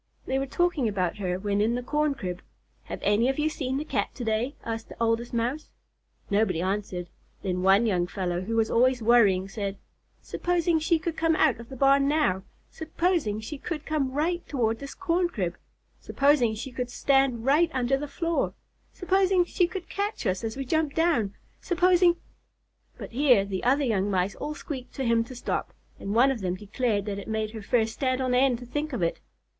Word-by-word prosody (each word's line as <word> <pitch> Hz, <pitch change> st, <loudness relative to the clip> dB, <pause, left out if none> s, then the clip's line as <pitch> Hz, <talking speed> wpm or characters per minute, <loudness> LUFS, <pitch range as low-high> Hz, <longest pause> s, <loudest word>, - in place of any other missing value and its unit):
They 265 Hz, +1 st, 0 dB
were 270 Hz, -, -2 dB
talking 335 Hz, -4 st, +1 dB
about 190 Hz, -3 st, -1 dB
her 180 Hz, -3 st, -2 dB
when 200 Hz, +1 st, 0 dB
in 225 Hz, +3 st, +2 dB
the 245 Hz, -, -3 dB
corn 300 Hz, +2 st, 0 dB
crib. 180 Hz, -7 st, -5 dB, 0.4 s
"Have -, -, -6 dB
any 210 Hz, +5 st, +3 dB
of 270 Hz, -, -1 dB
you 305 Hz, +1 st, +1 dB
seen 265 Hz, -4 st, -3 dB
the 300 Hz, -, -3 dB
Cat -, -, -1 dB
to 250 Hz, -, -5 dB
day?" 225 Hz, +5 st, -1 dB
asked 225 Hz, -1 st, -4 dB
the -, -, -11 dB
Oldest 230 Hz, +1 st, 0 dB
Mouse. 245 Hz, +6 st, -2 dB, 0.6 s
Nobody 200 Hz, -4 st, +2 dB
answered. 185 Hz, -1 st, -2 dB, 0.4 s
Then 180 Hz, -2 st, -1 dB
one 195 Hz, +4 st, +5 dB
young 180 Hz, -5 st, +1 dB
fellow, 180 Hz, -2 st, -2 dB
who 225 Hz, +5 st, -3 dB
was 225 Hz, -1 st, +2 dB
always 250 Hz, 0 st, +3 dB
worrying, 205 Hz, -5 st, +4 dB
said: 200 Hz, -1 st, -4 dB, 0.4 s
"Supposing 345 Hz, -2 st, 0 dB
she 320 Hz, +1 st, +2 dB
should 330 Hz, 0 st, -3 dB
come 325 Hz, 0 st, +2 dB
out 295 Hz, -8 st, +3 dB
of 235 Hz, -, -11 dB
the 265 Hz, -, -8 dB
barn 275 Hz, +1 st, +4 dB
now! 290 Hz, -11 st, +2 dB, 0.3 s
Supposing 320 Hz, -, -1 dB
she 275 Hz, +6 st, -7 dB
should 310 Hz, -4 st, -4 dB
come 295 Hz, -4 st, -1 dB
right 330 Hz, +5 st, 0 dB
toward 225 Hz, -5 st, 0 dB
this 280 Hz, 0 st, -8 dB
corn 355 Hz, -1 st, +1 dB
crib! 185 Hz, -, -3 dB, 0.4 s
Supposing 275 Hz, -6 st, +2 dB
she 250 Hz, +4 st, -7 dB
should 250 Hz, -1 st, -3 dB
stand 270 Hz, -3 st, +2 dB
right 305 Hz, +5 st, +4 dB
under 260 Hz, -1 st, +1 dB
the 290 Hz, +2 st, -4 dB
floor! 330 Hz, +3 st, -1 dB, 0.4 s
Supposing 375 Hz, -1 st, +2 dB
she 350 Hz, 0 st, +1 dB
should 365 Hz, -3 st, -6 dB
catch 410 Hz, -, -3 dB
us 185 Hz, 0 st, 0 dB
as 225 Hz, +2 st, -4 dB
we 270 Hz, -, -3 dB
jumped 315 Hz, +1 st, 0 dB
down! 300 Hz, -, +1 dB, 0.2 s
Supposing 355 Hz, -1 st, +3 dB, 0.4 s
" -, -, -41 dB
But -, -, -8 dB
here 250 Hz, -5 st, +4 dB
the 195 Hz, -2 st, -4 dB
other 275 Hz, +4 st, +3 dB
young 205 Hz, -6 st, +1 dB
Mice 190 Hz, 0 st, 0 dB
all 300 Hz, -, -5 dB
squeaked 265 Hz, -4 st, -7 dB
to 270 Hz, -, -2 dB
him 230 Hz, -1 st, +3 dB
to 255 Hz, -, -10 dB
stop, 245 Hz, -, -3 dB, 0.2 s
and 200 Hz, +2 st, -3 dB
one 260 Hz, +4 st, +5 dB
of 245 Hz, -5 st, -4 dB
them 180 Hz, -1 st, -1 dB
declared 210 Hz, +1 st, -1 dB
that 200 Hz, -2 st, -3 dB
it -, -, -9 dB
made 220 Hz, -1 st, -2 dB
her 220 Hz, -1 st, -7 dB
fur 225 Hz, +2 st, +2 dB
stand 255 Hz, +3 st, -1 dB
on 255 Hz, -1 st, 0 dB
end 255 Hz, -1 st, +3 dB
to 245 Hz, -, -10 dB
think 295 Hz, +4 st, -3 dB
of 220 Hz, -8 st, -1 dB
it. 170 Hz, -, 0 dB
250 Hz, 205 wpm, -27 LUFS, 210-300 Hz, 0.6 s, one